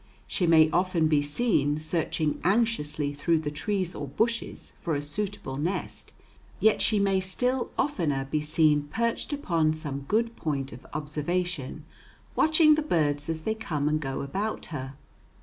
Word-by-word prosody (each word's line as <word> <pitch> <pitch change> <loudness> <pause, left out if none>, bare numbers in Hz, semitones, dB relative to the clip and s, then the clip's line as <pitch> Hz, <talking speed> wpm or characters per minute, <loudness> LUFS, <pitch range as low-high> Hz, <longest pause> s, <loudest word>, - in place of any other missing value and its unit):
She 180 - 0
may 160 -1 +7
often 175 -2 +2
be 150 -2 +3
seen 145 - +1
searching 155 -1 -1
anxiously 175 -9 +1
through 160 +4 +1
the 150 -2 -3
trees 185 +4 -1
or 145 - -5
bushes 225 - -2
for 165 -3 -2
a 145 - -1
suitable 170 -3 -1
nest, 170 +7 -3 0.5
yet 220 0 +4
she 215 - +3
may 195 -1 +2
still 250 +7 -1
oftener 155 - 0
be 150 +2 -1
seen 150 -1 +2
perched 235 - -1
upon 170 - +1
some 140 -3 -5
good 230 +2 +1
point 140 -6 -2
of 120 - -12
observation 150 0 -3 0.5
watching 315 0 +6
the 310 - +2
birds 150 - 0
as 160 -1 -2
they 220 - 0
come 155 -10 -2
and 155 0 +1
go 135 -2 -3
about 195 +10 -3
her. 135 -1 -5
160 Hz, 155 wpm, -27 LUFS, 145-205 Hz, 0.5 s, may